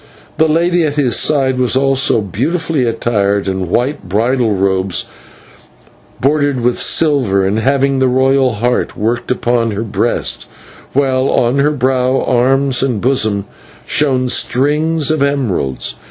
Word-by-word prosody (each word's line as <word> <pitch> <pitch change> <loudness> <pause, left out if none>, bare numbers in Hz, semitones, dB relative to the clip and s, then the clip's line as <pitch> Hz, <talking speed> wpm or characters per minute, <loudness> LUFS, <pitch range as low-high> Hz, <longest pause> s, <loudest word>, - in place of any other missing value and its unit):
The 160 - +4
lady 170 +2 +1
at 145 -2 -1
his 135 -5 +1
side 135 -4 +1
was 125 0 +2
also 135 -4 +2
beautifully 145 - -2
attired 100 -4 -1
in 95 -2 -3
white 125 -3 -2
bridal 115 +2 0
robes, 95 -1 0 1.1
broidered 145 -1 0
with 120 +1 0
silver, 130 -12 +2
and 100 +3 0
having 135 +2 +1
the 130 - +2
royal 130 0 +2
Heart 120 +3 -1
worked 115 +3 -2
upon 120 -2 0
her 105 +3 -3
breast, 110 - -2 0.4
while 130 -1 +1
on 125 +3 +1
her 145 +2 +3
brow, 130 -2 0
arms, 130 +1 +1
and 130 -5 -1
bosom 110 -5 0 0.4
shone 130 -4 +1
strings 150 +5 +1
of 155 -2 -1
emeralds. 125 - -1
130 Hz, 135 wpm, -14 LUFS, 115-140 Hz, 1.1 s, The